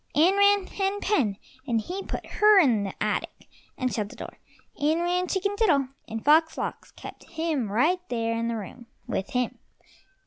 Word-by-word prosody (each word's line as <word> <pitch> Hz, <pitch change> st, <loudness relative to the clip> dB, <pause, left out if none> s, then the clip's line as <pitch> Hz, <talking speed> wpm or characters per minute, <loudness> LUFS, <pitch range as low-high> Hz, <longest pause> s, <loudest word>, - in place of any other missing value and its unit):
In 330 Hz, +6 st, +5 dB
ran 405 Hz, -1 st, +4 dB
Hen 390 Hz, +1 st, -2 dB
pen, 265 Hz, -, +1 dB, 0.3 s
and 230 Hz, -3 st, +1 dB
he 360 Hz, -, -5 dB
put -, -, -6 dB
her 420 Hz, -1 st, +5 dB
in 235 Hz, -, +3 dB
the 195 Hz, -, -6 dB
attic, -, -, -3 dB, 0.3 s
and 255 Hz, -2 st, -1 dB
shut 210 Hz, -3 st, -2 dB
the -, -, -12 dB
door. -, -, -9 dB, 0.4 s
In 305 Hz, +3 st, +1 dB
ran 360 Hz, +1 st, 0 dB
Chicken 400 Hz, +2 st, -1 dB
diddle, 305 Hz, -, +2 dB, 0.2 s
and 225 Hz, 0 st, -6 dB
Fox 320 Hz, +2 st, +4 dB
lox -, -, -4 dB
kept -, -, -11 dB
him 315 Hz, -10 st, -2 dB
right 315 Hz, -, +2 dB
there 230 Hz, -1 st, -1 dB
in 230 Hz, 0 st, -1 dB
the 235 Hz, -, -2 dB
room 225 Hz, +4 st, -9 dB, 0.2 s
with 190 Hz, -, -3 dB
him. 250 Hz, -1 st, -2 dB
300 Hz, 180 wpm, -26 LUFS, 230-375 Hz, 0.4 s, In